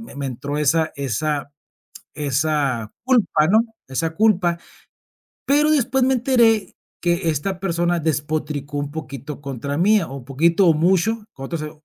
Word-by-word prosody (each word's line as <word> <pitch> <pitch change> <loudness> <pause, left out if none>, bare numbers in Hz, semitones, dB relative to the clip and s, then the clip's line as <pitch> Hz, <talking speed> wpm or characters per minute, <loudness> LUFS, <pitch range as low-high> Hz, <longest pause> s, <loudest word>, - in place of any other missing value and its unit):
me 225 - -11
me 140 - -3
entró 140 +3 -4
esa 155 +2 +2
esa 140 +2 -2 0.6
esa 140 -5 -1
culpa, 200 -11 +3
¿no?, 220 - +6 0.3
esa 160 +5 -2
culpa 185 -5 +2 0.9
pero 295 +2 +3
después 265 -3 +2
me 265 - +3
enteré 235 -4 +2 0.3
que 175 0 +1
esta 180 +5 -3
persona 175 -2 0
despotricó 150 -1 -2
un 145 0 -3
poquito 145 -2 -7
contra 140 +1 -4
mía 205 0 +3
o 135 - -7
un 125 - -12
poquito 165 +7 +3
o 165 - +6
mucho 190 +7 +1
con 135 - -9
otro 170 - -4
sé 155 0 -5
160 Hz, 150 wpm, -21 LUFS, 145-195 Hz, 0.9 s, no